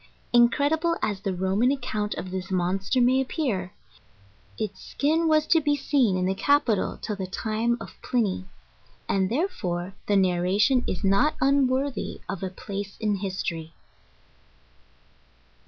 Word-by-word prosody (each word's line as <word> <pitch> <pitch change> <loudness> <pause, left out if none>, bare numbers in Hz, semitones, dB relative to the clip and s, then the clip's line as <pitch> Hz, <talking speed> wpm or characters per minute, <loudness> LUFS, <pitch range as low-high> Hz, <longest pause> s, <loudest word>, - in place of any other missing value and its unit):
* - - -35
Incredible 290 +8 +3
as 205 -2 -1
the 195 -2 -2
Roman 190 +7 +2
accounts 215 -6 -2
of 185 - -5
this 185 0 -4
monster 190 +6 0
may 255 +2 +4
appear, 240 - -2 0.9
its 205 -2 -4
skin 320 +3 +1
was 310 -1 +3
to 325 0 +4
be 290 -1 +2
seen 260 -8 +2
in 180 - 0
the 190 - +1
capitol 230 -1 +1
till 215 - -4
the 190 -2 -4
time 220 +5 -1
of - - -11
Pliny, 215 -7 0 0.6
and, 190 -1 +1
therefore, 195 - -2
the 205 - +2
narration 195 +6 +3
is 185 - -3
not 200 +11 +3
unworthy 270 -2 +1
of 195 - -4
a 190 - -2
place 200 -1 -6
in 210 -2 0
history. 175 -4 -4
210 Hz, 140 wpm, -26 LUFS, 190-265 Hz, 0.9 s, may